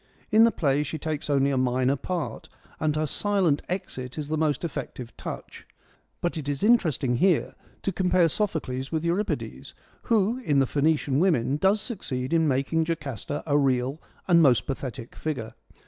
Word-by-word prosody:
In 220 +2 +7
the 230 - +4
play 145 -6 +1
she 150 +2 -3
takes 155 -1 -4
only 140 -1 +3
a 135 - 0
minor 130 +1 +2
part, 170 +4 -4 0.3
and 155 -1 +1
her 155 0 +1
silent 185 -2 +1
exit 130 -8 -4
is 150 -1 -4
the 155 - 0
most 155 -1 0
effective 130 -6 -5
touch; - - -8 0.5
but 175 -1 -1
it 145 -2 -4
is 145 +3 -2
interesting 160 - +3
here 185 +2 +2 0.3
to 195 - 0
compare 180 -2 +3
Sophocles 145 -8 -2
with 160 0 -1
Euripides, 180 +5 -2 0.3
who 225 +1 +2
in 150 - +1
the 135 - +5
Phoenician 145 0 +1
Women 150 -7 +2
does 195 +6 +3
succeed 155 - -4
in 160 -1 +3
making 145 +4 +1
Jocasta 145 -3 -4
a 145 -1 +3
real 135 +2 +1 0.3
and 170 -2 +6
most 130 -6 +4
pathethic 130 -3 -5
figure. 130 -8 -4
150 Hz, 165 wpm, -26 LUFS, 135-175 Hz, 0.5 s, In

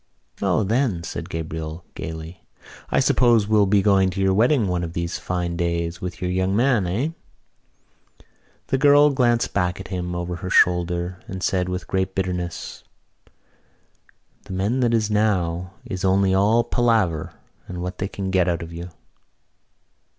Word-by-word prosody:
"O, 95 +1 +2
then," 110 -4 0
said - - -6
Gabriel 80 +1 -5
gaily, 80 +2 -7 0.5
"I - - +2
suppose 120 -4 +3
we'll 105 -2 +4
be 100 0 +3
going 95 -2 +4
to 95 +2 -5
your 95 0 +3
wedding 115 +2 +3
one 90 -1 -1
of 85 -1 -5
these 85 0 -3
fine 90 -1 -2
days 85 -1 -2
with 90 -1 -5
your 90 - -1
young 95 +1 0
man, 120 -5 +2
eh?" 115 - -1 1.6
The 135 - +1
girl 145 +1 +6
glanced 120 -3 +1
back 90 -2 0
at 95 - -8
him 90 -2 -3
over 85 0 -3
her 90 - -6
shoulder 90 0 +2
and 95 -1 -6
said 90 -1 0
with 90 0 -4
great 95 0 -2
bitterness: 90 -2 -4 1.6
"The - - -8
men 100 +7 0
that 120 -2 +2
is 110 -1 0
now 90 -4 0
is 95 0 -5
only 95 0 +3
all 105 +5 +3
palaver 110 -12 +1 0.3
and 90 -1 -6
what 90 +1 -5
they 95 - -1
can 95 -1 -4
get 90 -2 +2
out 85 -1 -1
of 85 0 -9
you." 85 +2 -7
95 Hz, 160 wpm, -23 LUFS, 85-105 Hz, 1.6 s, girl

